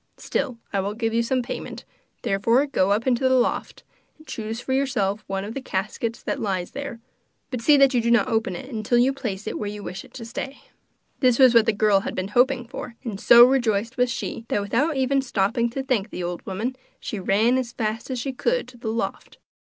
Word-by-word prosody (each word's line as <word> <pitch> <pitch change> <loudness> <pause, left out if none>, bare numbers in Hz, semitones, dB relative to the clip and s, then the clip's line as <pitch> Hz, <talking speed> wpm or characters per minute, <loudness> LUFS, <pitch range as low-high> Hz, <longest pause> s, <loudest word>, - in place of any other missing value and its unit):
Still, 260 -4 -2 0.2
I 200 - +1
will 200 +2 -2
give 225 0 -1
you 230 - +3
some 250 +2 0
payment, 240 - -6 0.4
therefore 230 +8 +2
go 200 -10 +1
up 210 +3 +1
into 260 0 +2
the 260 - +4
loft, 245 - 0 0.3
and 310 - -18
choose 225 -4 -5
for 260 - -3
yourself 220 -7 0
one 195 0 -3
of 215 - -6
the 275 - -4
caskets 225 +1 -3
that - - -3
lies 185 -4 -2
there. 280 -4 -6 0.5
But 250 -3 -3
see 290 +4 +6
that 275 -1 +5
you 245 - +3
do 235 - 0
not 235 -4 +4
open 220 -5 0
it 225 +1 -6
till 240 +3 +2
you 255 +3 +4
place 220 -7 -5
it - - -4
where 205 - -3
you 205 0 -7
wish 185 - -6
it 260 - -17
to 235 -3 -7
stay.' 270 +4 -6 0.6
This 250 -3 +4
was 260 -3 +7
what 230 -1 +5
the - - +5
girl 210 -1 +3
had - - -5
been 185 +1 -3
hoping 245 +2 +2
for, 235 0 -7
and 215 -6 -5
so 235 0 +9
rejoiced 235 -3 +1
was 250 -1 +2
she, 230 - -4
that, 205 - 0
without 270 +9 0
even 270 +1 +2
stopping 235 -1 0
to 265 +3 -4
thank 235 -6 0
the 180 - -5
old 175 0 -4
woman, 220 +7 -3 0.2
she 215 - -5
ran 220 +7 +2
as 245 -2 -4
fast 225 0 -3
as 260 - -2
she 265 +3 -3
could 485 - 0
to 250 - -15
the 230 -2 -4
loft. 230 +1 -4
235 Hz, 230 wpm, -24 LUFS, 210-260 Hz, 0.6 s, so